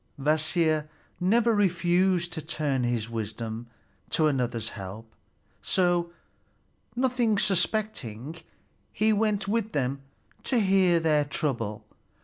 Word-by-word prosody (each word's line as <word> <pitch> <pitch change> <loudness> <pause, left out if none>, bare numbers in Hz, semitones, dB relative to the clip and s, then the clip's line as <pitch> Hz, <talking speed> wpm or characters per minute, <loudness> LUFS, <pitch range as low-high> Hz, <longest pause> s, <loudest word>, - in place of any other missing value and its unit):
Kvasir 155 +1 +1 0.3
never 225 +6 +3
refused 180 -2 +2
to 160 - -4
turn 145 -3 -1
his 120 -2 0
wisdom 115 +1 -5 0.4
to 155 - +2
another's 120 -6 0
help; 105 +3 -9 0.5
so, 175 -2 +1 0.8
nothing 245 -4 +1
suspecting, 175 - -1 0.5
he 215 +1 +2
went 210 -1 +1
with 220 +1 -1
them 135 -1 -1 0.4
to 255 - 0
hear 190 -4 +4
their 155 -2 +2
trouble. 115 -7 -3
160 Hz, 105 wpm, -27 LUFS, 120-195 Hz, 0.8 s, hear